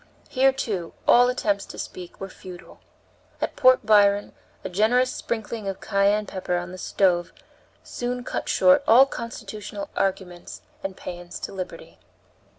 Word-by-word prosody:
Here, 270 0 +4
too, 205 -10 -4
all 245 +1 +6
attempts 205 -5 0
to - - -10
speak 180 -1 -8
were 195 - -5
futile. 185 -2 -12 0.6
At - - -3
Port 255 -2 +5
Byron 205 -1 +4 0.3
a - - -3
generous 225 +7 +2
sprinkling 220 -2 -4
of 195 - -4
cayenne 200 +2 +1
pepper 185 -2 -3
on 175 +1 -5
the 185 - -9
stove 180 -3 +1 0.5
soon 245 0 -4
cut - - -4
short 275 +1 +5
all 245 +4 +8
constitutional 210 -5 -7
arguments 185 -2 -3 0.2
and 195 -1 -5
paeans 175 0 -8
to - - -6
liberty. 185 -2 -8
200 Hz, 145 wpm, -24 LUFS, 185-240 Hz, 0.6 s, all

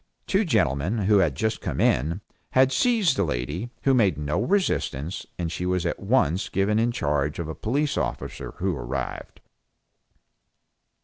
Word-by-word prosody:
Two 195 +3 +2
gentlemen, 90 - +1
who 100 +1 +4
had 80 -8 +2
just 110 +9 -1
come - - -3
in, 80 +10 +2 0.3
had 130 0 +5
seized 210 - +3
the 100 - +1
lady, 75 - -3
who 135 - +4
made 100 - +3
no 75 +6 -1
resistance, 100 - -1
and 85 -2 -2
she 90 - -4
was 90 -1 0
at - - -1
once 90 +6 +1
given 100 +3 +1
in 120 +1 +2
charge 75 - -1
of 85 - -4
a 80 - -4
police 140 - -1
officer 60 -1 -4
who 95 -1 -1
arrived. - - -5
95 Hz, 160 wpm, -25 LUFS, 75-120 Hz, 0.3 s, had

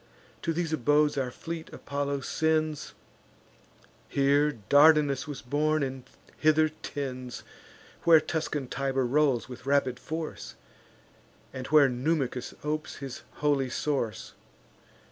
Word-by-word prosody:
To 165 - -1
these 165 -1 -2
abodes 150 +1 +3
our 135 -3 -1
fleet 165 +5 -7
Apollo 140 0 -3
sends; 155 0 -1 1.1
Here 140 +2 +3 0.2
Dardanus 145 -1 +5
was 145 -2 -7
born, 150 +3 +1
and 130 -1 -5 0.3
hither 155 0 +4
tends; 130 -5 -6 0.6
Where 165 -2 +7
Tuscan 155 -4 -3
Tiber 135 0 -1
rolls 135 -1 +2
with 130 +1 -10
rapid 140 -3 +2
force, 160 0 -6 1.0
And 130 -1 -6
where 150 -2 +6
Numicus 130 0 -1
opes 155 +1 -3
his 135 -3 -7 0.2
holy 140 -3 +2
source. 125 -7 -2
145 Hz, 110 wpm, -28 LUFS, 130-155 Hz, 1.1 s, Where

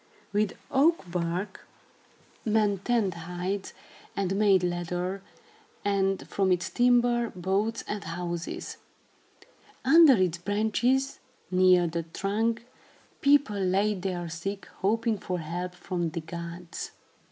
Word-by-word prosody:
With 205 -1 +1
oak 320 +5 +4
bark, 175 +3 -3 0.8
men 210 -3 +2
tanned 215 -2 +1
hides 180 +4 -4 0.4
and 195 -1 0
made 195 -3 +4
leather, 180 +2 -2 0.6
and, 195 -1 +1
from 195 -2 +1
its 180 0 0
timber, 240 -1 +3
boats 195 +5 0
and 210 -1 -3
houses. 170 0 -4 1.1
Under 315 +1 +8
its 180 -3 +1
branches, 220 +8 +1 0.3
near 185 -1 +5
the 170 0 -2
trunk, 215 +7 -1 0.6
people 280 -8 +4
laid 195 +1 +1
their 180 -2 -3
sick, 195 +5 -5
hoping 220 +2 +1
for 180 0 -3
help 175 +2 -4
from 175 -2 -2
the 165 +1 -4
gods. 170 +1 -7
195 Hz, 110 wpm, -28 LUFS, 175-215 Hz, 1.1 s, Under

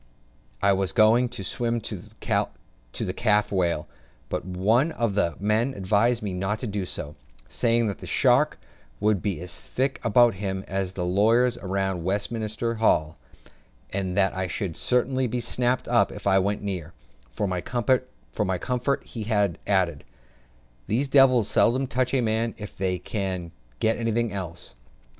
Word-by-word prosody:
I 100 0 +5
was 95 -1 -1
going 115 +2 +5
to 110 -5 -7
swim 115 +4 -1
to 105 -1 -5 1.1
the 90 - -2
calf 105 -1 +2
whale; 85 -5 0 0.4
but - - -2
one 105 - +2
of 115 -4 0
the 90 -4 +1
men 110 +6 +1
advised 105 +5 +1
me 100 -3 -2
not 95 +3 -1
to - - -3
do 100 -3 -2
so, 75 -2 -6 0.3
saying 115 0 +1
that 100 -4 -3
the - - -9
sharks - - +3 0.4
would 105 -3 +2
be 100 -3 -2
as 90 0 -6
thick 135 +1 -2
about 120 +2 +5
him 95 0 -4
as 95 -1 -2
the 90 -2 -3
lawyers 115 +7 +3
round 95 -2 -1
Westminster 110 +4 -1
Hall; 80 - +2 0.7
and 95 -1 -2
that 95 -1 +3
I 95 0 -1
should 90 -1 -3
certainly 130 +1 +1
be 120 +2 -2
snapped 125 +1 0
up - - +3
if - - -10
I 95 -1 +4
went 100 +2 -1
near: 90 -5 -4 0.4
for 80 - -2
my 90 -1 -2
comfort 125 0 -1
he 110 -2 -7
added, 95 -5 +1 0.8
"These 130 +6 0
devils 130 -5 +5
seldom 130 +5 +3
touch 130 0 0
a 130 - +3
man 115 0 0
if 105 -1 -8
they 95 -1 -1
can 90 -2 -4 0.3
get 110 - +1
anything 115 -1 0
else." 90 -5 -6
105 Hz, 155 wpm, -25 LUFS, 95-120 Hz, 1.1 s, I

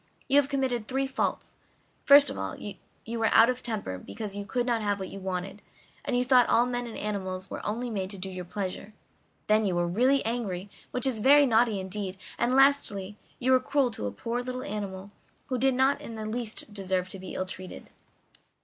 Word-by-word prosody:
"You 280 - +4
have 285 -1 +4
committed 255 -5 -1
three 270 +1 0
faults. 265 0 -3 0.5
First 280 0 +8
of - - -7
all, 95 0 -4
you 225 +2 -8
were 225 - +3
out 225 +2 +7
of 250 0 -7
temper 210 - -4
because 210 - -7
you 200 0 -5
could 245 +5 -1
not 235 -2 0
have 205 -1 0
what 190 - -5
you 195 - -7
wanted, 190 +2 -4 0.4
and 265 -4 0
you 250 - +1
thought 250 -2 +5
all 235 - +4
men 245 -1 -3
and 230 - -7
animals 190 -2 -4
were - - -5
only 235 +3 -3
made 190 -3 -3
to 200 - -7
do 190 +1 -5
your 180 -1 -6
pleasure; 200 +3 -5 0.5
then 215 +1 +3
you 190 -4 0
were 175 0 +1
really 255 +10 +2
angry, 205 -5 -3 0.2
which 250 - +3
is 255 -5 +1
very 285 +5 +6
naughty 225 -4 +3
indeed; 190 0 -5 0.2
and 245 +2 +2
lastly, 215 -8 +2 0.2
you 260 +1 +1
were 260 - +6
cruel 265 -1 +1
to 105 - -4
a - - -3
poor 235 - -3
little 255 +1 -5
animal 200 -1 -5 0.4
who 255 -2 -1
did 265 +1 +3
not 265 +2 +2
in 230 - -8
the 220 -1 -5
least 220 -1 -4
deserve 190 -2 -1
to 195 - -7
be 185 -1 -8
ill 185 - -1
treated. 185 0 -9
220 Hz, 210 wpm, -28 LUFS, 195-250 Hz, 0.5 s, First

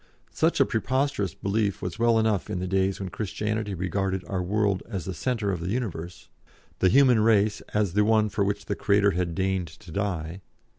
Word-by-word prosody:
Such 160 -1 +1
a 135 - +6
preposterous 130 - -1
belief 100 0 -1
was 90 +3 -5
well 115 -1 +4
enough 110 -3 +1
in 105 - -2
the 90 - -2
days 95 +1 0
when 95 -2 -4
Christianity 105 +1 -3
regarded 95 +1 -2
our 95 -2 -2
world 100 +1 0
as 95 -7 -4
the 95 - -4
centre 110 +1 -1
of 90 - -2
the 85 +2 -4
universe, 95 -7 -4 0.5
the 95 - +4
human 125 +1 +5
race 105 -1 +3
as 105 -4 +1
the 105 +1 +3
one 110 0 +3
for 100 0 -1
which 100 +1 -2
the - - -1
Creator 100 0 +3
had 85 -2 -2
deigned 95 -2 0
to 85 +3 -14
die. 90 -2 -3
100 Hz, 195 wpm, -26 LUFS, 95-110 Hz, 0.5 s, a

